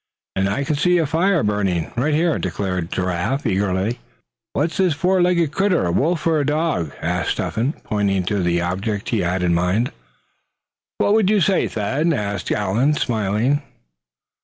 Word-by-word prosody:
"And 95 0 +1
I 105 +8 -1
can 150 +2 -1
see 180 +4 +3
a 165 - +2
fire 170 +4 +2
burning, 100 -5 0
right 145 +5 +1
here," 165 0 +1
declared 90 -3 -3
Giraffe, 90 +10 -1
eagerly. 100 +2 0 0.5
"What's 160 +4 -1
this 185 -5 +2
four 185 +4 +2
legged 175 -4 +2
critter, 190 - +1
a 85 - 0
wolf 160 - 0
or 160 -2 +3
a - - +1
dog?" 150 - 0
asked - - 0
Step - - -3
hen, 120 +7 0
pointing 100 -3 0
to 100 +2 -1
the 85 -1 +1
object 100 +4 -2
he 115 - +1
had 90 0 0
in 85 -1 +2
mind. 90 +8 +1 1.1
"What 205 - +2
would 215 -3 +3
you 210 -1 +4
say, 190 +2 +2
Thad?" 135 +10 0
asked 100 -6 -3
Allan, 110 +9 +1
smiling. 115 +4 0
115 Hz, 170 wpm, -21 LUFS, 95-160 Hz, 1.1 s, you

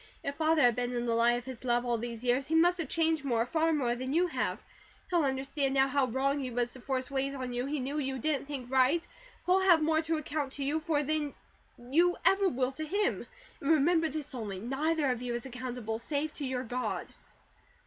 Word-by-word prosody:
If 280 - -2
Father 315 0 +2
has 245 -1 +6
been 245 +1 -2
in 240 0 -1
the 235 - +1
light 235 +1 +3
of 245 - -7
His 260 -2 -8
love 240 -1 +1
all 240 -1 0
these 235 0 -6
years, 250 +2 +1
he 320 - 0
must 350 +2 +4
have 315 -5 -3
changed 320 -2 +1
more, 235 -4 +1
far 325 +5 +1
more 265 -6 +1
than 260 +2 -4
you 345 +3 +3
have. 355 - -1 0.5
He'll 345 -3 +3
understand 270 0 0
now 270 0 +4
how 275 -1 +1
wrong 270 +4 0
he 260 -2 -3
was 240 0 -1
to 255 - -11
force 260 +1 -3
ways 275 0 -1
on 255 -2 -4
you 245 +2 -2
he 295 +1 -2
knew 275 +4 -2
you 265 -2 -2
didn't 275 +1 -1
think 265 -4 -6
right; 265 +6 +3 0.4
he'll 365 +1 +4
have 350 -5 +5
more 315 0 +2
to 325 0 -1
account 295 -3 -3
to 280 - -3
you 290 +3 0
for 310 -2 0
than 300 0 0 0.4
you 325 +9 +2
ever 390 0 +4
will 255 -3 0
to 310 +4 -6
him; 400 +7 0 0.3
and 280 - -2
remember 320 +1 +4
this 295 -1 -4
only, 215 -6 -5
neither 280 +5 0
of 245 -1 -3
you 245 -1 -3
is 240 - -5
accountable, 250 -3 -5
save 295 +4 -2
to 285 - -4
your 255 -1 -2
God." 250 +1 -3
275 Hz, 230 wpm, -30 LUFS, 250-310 Hz, 0.5 s, has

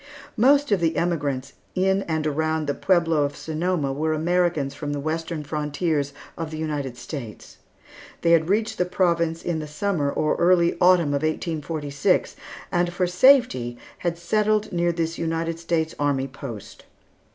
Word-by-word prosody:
Most 280 +3 +4
of 200 - +4
the 165 -1 +1
emigrants 145 -6 -1 0.2
in 190 +1 +2
and 160 -2 -1
around 155 +1 0
the 145 - 0
Pueblo 170 -3 +2
of 145 0 -1
Sonoma 160 -3 -1
were 155 +3 0
Americans 165 -3 +1
from 145 -2 -4
the 145 - -3
western 160 +1 -3
frontiers 150 0 -1 0.2
of 165 -2 -4
the 155 - -6
United 145 -5 -3
States. 120 -4 -8 0.7
They 170 - +4
had 165 0 +4
reached 215 +3 0
the 180 - +3
province 170 -2 0
in 170 -2 -1
the 155 - -5
Summer 150 -1 -1
or 155 +1 0
early 170 -1 +4
Autumn 180 -4 +5
of 140 - 0
1846, 155 -2 -1 0.4
and 175 0 +1
for 180 +1 0
safety 180 - +4 0.2
had 170 -1 -2
settled 215 +4 +1
near 175 0 +2
this 165 0 -2
United 165 0 -2
States 165 -1 -1
Army 140 -2 +1
post. 130 -6 -9
160 Hz, 155 wpm, -24 LUFS, 145-175 Hz, 0.7 s, Autumn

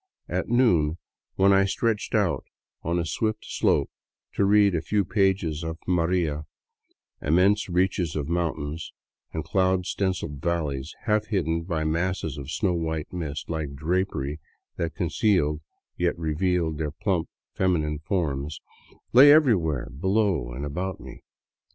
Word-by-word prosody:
At - - -2
noon, 90 -11 +3 0.4
when 100 +1 +5
I 95 0 +5
stretched 105 +3 -1
out - - +1 0.4
on 85 +2 -1
a 85 - 0
swift 110 +6 -2
slope - - +1 0.4
to 100 - +2
read 100 -1 +5
a 80 - 0
few 100 +2 0
pages 95 -7 +1
of 80 0 -4
" - - -29
Maria," 85 -3 +1 0.8
immense 95 +7 +3
reaches 90 -2 +1
of 75 -2 -2
mountains 80 -2 -2 0.4
and 80 - -3
cloud 95 -1 +1
stenciled 95 -8 -2
valleys, 80 -4 -2
half 105 -2 +1
hidden 85 -6 0
by 80 -3 -1
masses 80 -2 -1
of 70 0 -8
snow 95 +3 0
white 80 -1 -3
mist, 80 -4 -4
like 80 -4 -3
drapery 80 -2 -1 0.4
that 85 -2 -3
concealed 85 -4 +1 0.4
yet 90 -1 0
revealed 80 0 0
their 75 -2 -1
plump, 90 +2 -1 0.2
feminine 75 -5 0
forms, 75 -4 -2 0.5
lay 135 +4 +9
everywhere 90 - +3
below 95 - 0
and 65 +4 -5
about 90 +6 -3
me. - - -11
85 Hz, 140 wpm, -26 LUFS, 75-95 Hz, 0.8 s, lay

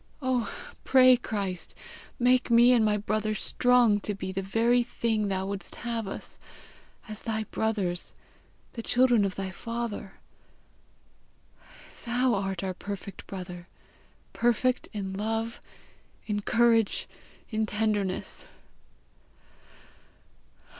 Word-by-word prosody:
Oh, 255 -4 0 0.3
pray, 255 -1 +7
Christ! 200 -7 -4 0.4
make 250 0 +3
me 235 +1 +7
and 240 -3 +5
my 210 -1 +2
brother 215 +1 -1
strong 240 0 +3
to 205 0 -3
be 190 -1 -5
the 190 +1 -2
very 230 +5 +2
thing 225 -3 -1
thou 190 -1 -1
wouldst 195 -2 -5
have 230 -3 -3
us, - - -7 0.7
as 215 -1 -6
thy 220 -1 -2
brothers, 200 -6 -1 0.6
the 230 - -5
children 245 -2 +3
of 190 - -2
thy 190 -1 -4
Father. 230 -2 -5 1.9
Thou 245 +1 +1
art 195 -2 -2
our 190 -1 -2
perfect 200 0 -7
brother 180 -2 -7 0.7
perfect 240 +2 +1
in 195 -3 -4
love, 225 +3 -2 0.6
in 205 -1 -1
courage, 225 0 +2 0.4
in 215 0 0
tenderness! 210 -3 -1
215 Hz, 110 wpm, -28 LUFS, 195-235 Hz, 1.9 s, pray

